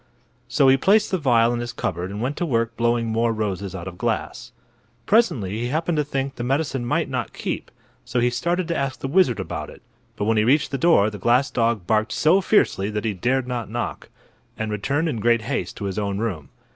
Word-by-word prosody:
So 135 - +3
he 130 0 +6
placed 205 +9 +3
the 185 - +1
vial 120 -5 +3
in 120 - -2
his 120 0 -4
cupboard 90 -5 -3
and 105 +3 -5
went 135 +3 -1
to - - -1
work 115 -3 0
blowing 120 0 +1
more 115 +1 +1
roses 100 -3 -3
out 90 -1 -6
of 90 -1 -8
glass. - - -3 0.5
Presently 115 - +2
he 120 - -2
happened 160 +4 -1
to 150 - +2
think 135 -1 -3
the 120 - -6
medicine 135 0 -1
might - - +1
not - - -3
keep, - - -4 0.3
so 120 0 -2
he 120 +1 +2
started 170 +7 -1
to 170 - 0
ask 135 -3 -2
the - - -2
wizard 140 - +3
about - - -5
it. - - -14 0.3
But 105 - -2
when 110 +1 +2
he 105 - +4
reached 140 +6 +2
the 135 - -2
door 115 -10 +4
the 105 - -8
glass 125 +7 +2
dog 115 -5 0
barked 110 +5 +1
so 175 +6 +4
fiercely 105 - +2
that 105 +1 -3
he 110 - 0
dared 125 +7 0
not 120 -3 -3
knock, 120 +2 -4 0.5
and 110 -1 -3
returned 135 +10 -1
in 120 -8 -2
great 115 0 +2
haste 130 +4 -3
to 100 - -5
his 95 0 -2
own 100 -1 -2
room. 90 -11 -3
120 Hz, 225 wpm, -23 LUFS, 105-135 Hz, 0.5 s, he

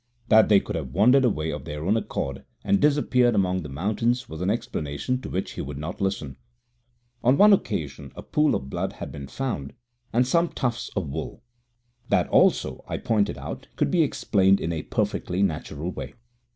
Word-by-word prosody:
That 110 0 +6
they 100 -2 +7
could - - -6
have 70 -6 -5
wandered 125 +8 +5
away 80 -9 0
of 75 -2 -6
their 75 +1 -5
own 100 +4 +3
accord 70 -11 -3 0.2
and 100 - +2
disappeared 125 -5 +3
among 95 -2 +1
the 75 - -7
mountains 110 - -1
was 80 +1 -8
an 90 - 0
explanation 105 - -2
to - - -7
which 95 - -3
he - - -5
would 70 0 -6
not 80 +6 -6
listen. 90 -9 -2 0.9
On 125 +3 +4
one 210 0 +8
occasion 80 - -2
a - - -8
pool 150 0 +2
of 65 - -4
blood - - -3
had - - -7
been 70 -1 -8
found, 90 - -4 0.4
and 125 +2 +3
some 170 +6 +2
tufts 120 -2 -2
of 95 -6 -1
wool. 75 +9 -6 0.7
That - - +3
also, 65 - +3
I - - -3
pointed 105 -3 0
out, - - -7
could - - 0
be 175 - +3
explained 100 -9 +3
in 85 - -2
a 80 - -2
perfectly 90 +3 -1
natural 80 -1 -2
way. - - -7
95 Hz, 190 wpm, -25 LUFS, 75-120 Hz, 0.9 s, one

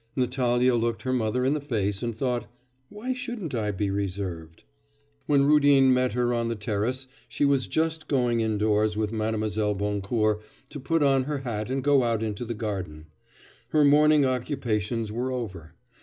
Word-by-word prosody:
Natalya 125 -1 +2
looked 115 -1 -1
her 130 - -1
mother 125 +1 0
in 135 - +2
the 150 - -2
face 105 -8 -2
and 115 -2 -3
thought, 120 -3 -1 0.4
'Why 235 +5 -4
shouldn't 240 - -5
I 110 -3 -1
be 100 0 -1
reserved?' 90 -5 -4 0.6
When 140 -1 +4
Rudin 140 -3 +5
met 125 -3 +1
her 120 0 +1
on 115 -1 0
the 115 - -2
terrace 110 +5 -2 0.2
she 145 - 0
was 140 -2 +2
just 160 0 -1
going 125 -4 +1
indoors 105 -1 +1
with 110 0 -1
Mlle. 110 -1 -1
Boncourt 105 +2 0 0.3
to 145 - -7
put 160 +3 0
on 135 -2 +3
her 150 0 -2
hat 115 -3 -4
and 135 0 -2
go 145 -1 +4
out 115 -2 0
into 110 +2 -3
the 115 0 -4
garden. 95 -8 -5 0.6
Her 150 -1 +4
morning 150 0 +5
occupations 120 -4 -2
were 125 +4 -2
over. 95 -11 -6
120 Hz, 170 wpm, -26 LUFS, 105-135 Hz, 0.6 s, Rudin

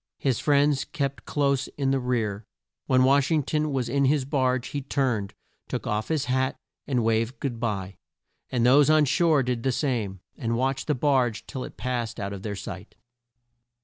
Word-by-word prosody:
His 130 -5 0
friends 145 -1 +3
kept 140 -4 -4
close 140 -2 +1
in 135 -2 +1
the 135 - +2
rear. 115 -5 -1 0.4
When 130 -1 +4
Wash 140 +1 +4
ing 155 -3 +2
ton 155 +2 -1
was 130 -3 -1
in 140 +3 +1
his 140 0 +2
barge 130 -3 0
he 145 - -3
turned, 125 -7 -1 0.3
took - - -4
off 105 +1 -1
his 155 -3 0
hat, 130 0 0 0.3
and 125 -5 +1
waved 115 +3 0
good 120 -5 -3
bye, 100 -5 -3 0.5
and 120 -2 +1
those 140 +4 +6
on 155 -1 +5
shore 155 0 +3
did 125 -1 -1
the 130 - +1
same, 115 - -2
and 115 0 -2
watched 135 +2 -1
the 150 - +2
barge 130 -5 +1
till 130 - -5
it - - -9
passed 120 -2 -3
out 100 0 -3
of 100 - -7
their 105 0 -4
sight. 100 -1 -8
130 Hz, 185 wpm, -26 LUFS, 115-140 Hz, 0.5 s, those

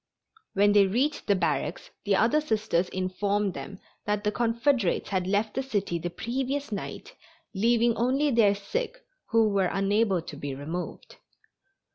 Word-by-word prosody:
When 205 +1 +5
they 205 -1 +5
reached 260 +10 0
the 200 - +4
barracks 160 -7 -2
the 200 -1 +3
other 240 +10 +3
Sisters 215 - 0
informed 195 +2 -1
them 195 - -8 0.3
that 210 0 0
the 210 - +1
Confederates 235 -2 +1
had 185 -2 -1
left 205 +2 0
the 265 - -1
city 200 -9 -2
the 175 +2 -3
previous 260 +8 -3
night, 200 - -6 0.4
leaving 230 +3 +3
only 270 +5 +1
their 215 -4 +4
sick 475 - -3 0.3
who 225 -2 +3
were 195 -2 +2
unable 195 -2 +1
to 150 - -8
be 140 -1 -5
removed. 160 +6 -6
205 Hz, 150 wpm, -27 LUFS, 190-235 Hz, 0.4 s, When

